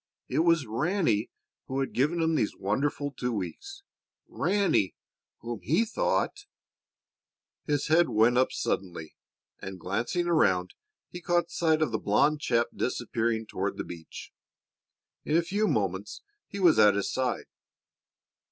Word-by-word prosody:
It - - -1
was 165 -3 +3
Ranny 120 - 0 0.4
who 135 +1 -2
had 135 - -2
given 160 +6 +1
him 160 0 +1
these 125 -9 0
wonderful 140 +8 -1
two 125 -2 -3
weeks 395 - -6 0.4
Ranny, 195 - +1 0.5
whom 120 -2 -5
he 175 - +2
thought 410 - -1 1.2
His 145 -2 0
head 165 +2 +4
went 115 +3 +3
up 130 +1 +3
suddenly 85 -5 -3 0.4
and, 95 -1 -7
glancing 115 - -1
around, 95 - +2 0.4
he 175 - -8
caught 175 0 0
sight 160 -2 +2
of 145 - -1
the 110 - -1
blond 145 +9 +2
chap 120 -3 +1
disappearing 115 -2 -1
toward 100 -2 -3
the - - -3
beach. 85 -2 -10 0.9
In 155 - +1
a 170 - +2
few 205 +5 0
moments 100 - -2 0.2
he 200 - -7
was 175 -4 +5
at 105 -1 +6
his 100 - -2
side. 130 -2 -1
130 Hz, 140 wpm, -28 LUFS, 105-170 Hz, 1.2 s, at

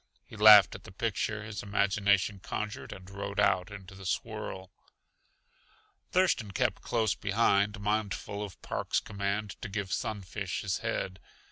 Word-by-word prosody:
He - - -12
laughed 105 -3 +9
at 95 - -9
the - - -12
picture 110 +1 -2
his 105 -1 -6
imagination 100 0 +1
conjured, 105 +3 -5
and 95 -1 -10
rode 100 +1 -5
out 90 +1 +3
into 100 -2 -10
the 95 -1 -8
swirl. 95 -2 -4 1.4
Thurston 180 - +2
kept 110 +1 0
close 110 -3 +1
behind, 100 0 +2
mindful 105 0 -2
of 100 -3 -8
Park's - - -1
command 100 0 -3
to 110 - -5
give 100 -2 -3
Sunfish 100 -2 -3
his 100 -2 -1
head. 95 -4 -3
100 Hz, 140 wpm, -30 LUFS, 95-105 Hz, 1.4 s, laughed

